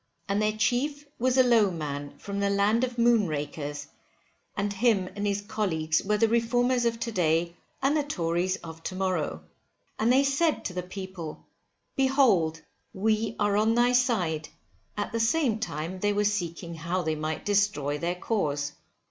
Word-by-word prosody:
And 200 +1 +1
their 215 0 0
chief 285 +6 0
was 255 +2 +2
a 260 - +7
_Low_(e) 230 -5 +4
man 145 -3 -5
from 200 0 -5
the 200 0 +1
land 205 +4 +2
of 250 -1 -1
moonrakers; 155 -10 0 0.7
and 205 0 -1
him 200 -3 +2
and 205 0 -2
his 200 0 0
colleagues 160 -7 -1
were 210 +1 +1
the 225 - +4
Reformers 245 +2 +2
of 230 -1 0
to 230 - -2
day 170 -2 +1 0.3
and 275 +3 +3
the 305 - +3
Tories 175 - -1
of 160 0 -9
to 185 - -5
morrow. 180 - -1 0.6
And 225 +2 +3
they 265 +2 +5
said 290 +4 +1
to 180 - -3
the 180 - -2
people, 185 -3 -8 0.5
behold 250 - +3 0.3
we 215 +2 0
are 205 -1 +2
on 220 +2 +3
thy 240 +1 +4
side, 190 - +1 0.5
at 205 - -2
the 230 - -1
same 230 -1 +2
time 175 -3 -4
they 205 +2 +1
were 205 0 +1
seeking 175 -4 -2
how 170 +3 -2
they 160 -1 0
might 155 0 -4
destroy 170 -9 +1
their 175 +2 -1
cause. 150 -8 -1
200 Hz, 170 wpm, -27 LUFS, 165-230 Hz, 0.7 s, a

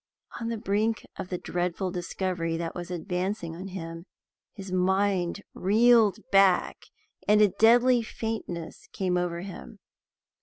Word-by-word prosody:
On 230 -1 -3
the 230 - -2
brink 215 +1 0
of 180 - -5
the 180 - -2
dreadful 180 +2 -2
discovery 175 -2 -2
that 165 0 -4
was 175 0 -6
advancing 180 0 -3
on 185 +3 -7
him, 165 -2 -7 0.5
his 195 -3 -8
mind 190 0 +1
reeled 220 0 +4
back, 195 -2 +3 0.4
and 210 0 +5
a 210 -1 +6
deadly 240 +4 +5
faintness 220 -7 -6
came 185 -2 -1
over 175 -1 -1
him. 195 +3 -9
190 Hz, 130 wpm, -27 LUFS, 175-210 Hz, 0.5 s, a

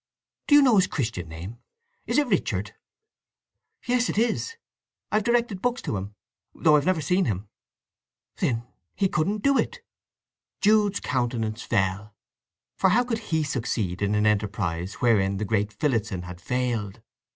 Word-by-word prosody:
Do 290 - +6
you 290 - +8
know 245 -5 +5
his 190 0 +4
Christian 110 - -3
name—is 120 - -7
it 295 - +4
Richard?" 245 - -1 1.1
"Yes—it 245 -3 +1
is; 235 - 0 0.6
I've 215 - +3
directed 235 -5 +1
books 245 +2 0
to - - -2
him, 100 +2 -5 0.4
though 150 - +4
I've 145 +1 +2
never 185 -4 +2
seen 180 +4 +2
him." 100 - -3 0.9
"Then 115 -2 0 0.3
he 195 - +2
couldn't 200 +5 -1
do 275 -1 +4
it!" 485 0 -2 0.8
Jude's 210 -1 +3
countenance 120 -3 -1
fell, 100 -1 -1 0.6
for 190 - +3
how 230 +6 +4
could 235 -2 -2
he 160 -1 +1
succeed 115 -10 -2
in 100 +1 +1
an 105 0 +2
enterprise 100 -4 -1
wherein 100 -5 +2
the 105 - -2
great 105 0 0
Phillotson 110 -6 -1
had 90 0 -9
failed? 115 -4 -2
120 Hz, 145 wpm, -25 LUFS, -, 1.1 s, you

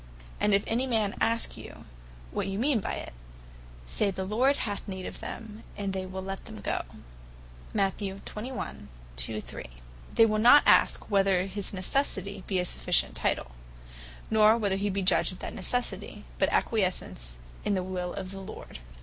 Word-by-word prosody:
And 210 - +3
if 200 - +2
any 245 +4 0
man 220 -5 +1
ask 230 0 +1
you, - - -10 0.5
what 185 - -1
you 195 0 -2
mean 255 +1 +3
by - - -3
it, - - -6 0.7
Say 65 - +1
the 190 0 -3
Lord 250 +8 +3
hath 205 -5 -3
need 190 -2 -5
of - - -6
them: 220 -1 -7 0.2
And 200 -1 -2
they 190 -1 -3
will 190 0 -5
let 195 0 -5
them 105 - -9
go." - - -1 2.4
They - - -2
will 215 -1 +1
not 245 +6 +8
ask - - +4
whether 195 -2 +3
his 195 0 0
necessity 200 -1 0
be 190 - 0
a 180 - +1
sufficient - - +1
title; 60 - 0 0.8
nor 220 +1 +6
whether 200 -4 +1
he 205 +1 0
be 195 0 -1
judge 185 - +3
of 185 - -9
that - - -6
necessity; 245 +6 -2
but - - +4
acquiesce 195 -5 +2 0.6
in 205 - +1
the 185 - 0
will 180 -1 -3
of 185 -1 -5
the 195 0 -7
Lord. 190 - -9
195 Hz, 160 wpm, -29 LUFS, 185-215 Hz, 2.4 s, not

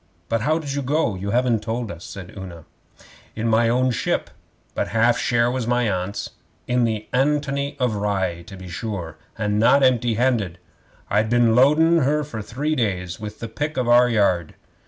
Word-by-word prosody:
'But 115 -1 0
how 155 +7 +2
did 145 -4 -4
you 140 - -1
go? 140 -3 0
You 95 +2 -5
haven't 120 -1 +1
told 115 0 -3
us,' 85 0 -9
said 95 -3 -9
Una. 90 -5 -9 0.7
'In 115 +1 -2
my 115 +1 +3
own 125 +2 +2
ship 120 - -1 0.4
but - - -1
half 115 +2 +3
share 120 -1 +1
was 125 -2 -2
my 120 -1 +2
Aunt's. 95 +2 -3 0.4
In 125 -1 +2
the 110 -2 -2
ANTONY 140 +1 0
OF 125 -3 +1
RYE, 95 -4 -1
to 95 - -10
be 95 0 -10
sure; 90 -3 -5 0.2
and 105 -1 0
not 135 +5 +5
empty 120 -3 +3
handed. 115 -7 0 0.5
I'd 110 +2 +2
been 120 -1 +3
loadin' 155 +6 +5
her 150 +1 +1
for 125 -6 -6
three 140 +9 -2
days 90 - -2
with 105 0 -7
the 115 - -4
pick 150 +7 -4
of 125 -2 0
our 120 +1 +6
yard. 95 -7 +1
115 Hz, 185 wpm, -22 LUFS, 100-130 Hz, 0.7 s, our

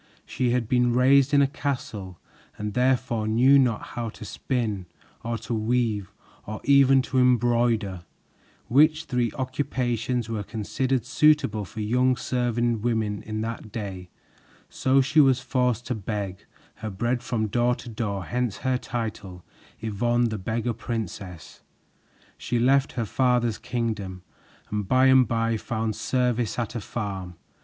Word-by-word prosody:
She 125 -1 -1
had 120 -2 0
been 125 0 +2
raised 135 +2 +5
in 140 -1 +5
a - - +3
castle 115 -10 -4 0.4
and 105 0 -4
therefore 125 -3 +1
knew 130 +6 +5
not 120 -5 0
how 120 -1 -3
to - - -8
spin 105 -3 -3 0.4
or 115 0 -2
to - - -3
weave 110 -3 0 0.4
or 110 0 -5
even 135 -1 +5
to 130 0 0
embroider, 120 -6 +2 0.7
which 155 +5 +4
three 125 -5 0
occupations 125 -3 -2
were 110 -2 -3
considered 120 +4 -2
suitable 135 -6 +3
for 110 +5 -7
young 125 +4 +2
serving 120 -2 0
women 110 -3 -1
in 110 0 -4
that 115 -1 -5
day, 95 -4 -6 0.6
so 135 +1 +3
she 135 +4 +2
was 135 -2 +4
forced 125 -3 0
to 125 - -2
beg 100 -3 -5 0.3
her 110 - -5
bread 120 +5 -1
from 115 -2 -1
door 120 +3 +1
to 125 - -11
door; 105 -5 -3
hence 120 -3 -2
her 130 -1 +1
title, 105 -8 -5 0.4
Yvonne, 120 +3 +1
the 110 -1 -4
Beggar 115 +5 -2
Princess. 105 -7 -6 0.8
She 120 - -1
left 135 +3 +3
her 115 - -2
father's 120 -1 +1
kingdom 105 -6 -3 0.5
and 105 -2 -2
by 130 +4 +4
and 130 -2 +6
by 115 0 0
found 110 -1 -3
service 125 0 0
at 115 -3 -2
a 120 - -4
farm. 95 -5 -5
120 Hz, 145 wpm, -25 LUFS, 110-125 Hz, 0.8 s, and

